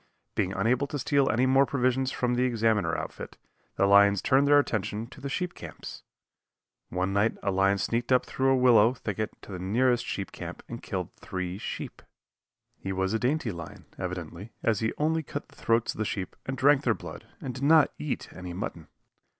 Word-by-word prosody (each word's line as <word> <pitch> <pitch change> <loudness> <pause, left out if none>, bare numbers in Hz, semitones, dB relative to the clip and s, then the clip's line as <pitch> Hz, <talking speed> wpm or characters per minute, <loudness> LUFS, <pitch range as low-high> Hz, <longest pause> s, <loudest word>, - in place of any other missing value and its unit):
Being 95 - 0
unable 120 +8 +1
to 145 - -4
steal 140 0 +2
any 125 +3 +2
more 135 +1 +4
provisions 130 0 +1
from 125 -1 0
the 125 - +1
Examiner 110 -8 +1
outfit, - - -7 0.4
the - - +3
lions 100 0 +6
turned 135 +7 +3
their 145 0 +7
attention 110 -5 0
to 120 - -14
the 140 - -4
sheep 180 +5 -2
camps. - - -9 0.9
One 95 +2 -1
night 100 +3 +2
a 100 - +1
lion 95 +1 +3
sneaked 115 +5 -1
up 125 - +4
through 135 0 0
a 135 - +4
willow 120 -2 +5
thicket 110 -2 -4
to - - -11
the 90 - -5
nearest 120 +6 +2
sheep 100 - -4
camp - - -8
and - - -7
killed - - -4
three 95 0 -5
sheep. - - -6 0.8
He 95 - -4
was 95 +1 -1
a 110 - +1
dainty 130 -1 0
lion, 85 -3 -9
evidently, 90 +3 -6
as 110 -3 +2
he 110 0 0
only 160 +2 +1
cut 145 0 -7
the - - -20
throats 115 0 +1
of - - -13
the - - +2
sheep 95 -3 -4
and 130 0 -3
drank 140 +1 +5
their 115 -5 +2
blood - - -10
and 130 - -5
did 130 +3 -7
not 155 +1 +5
eat 150 - -3
any 90 -1 -7
mutton. 85 -3 -5
115 Hz, 200 wpm, -28 LUFS, 100-130 Hz, 0.9 s, their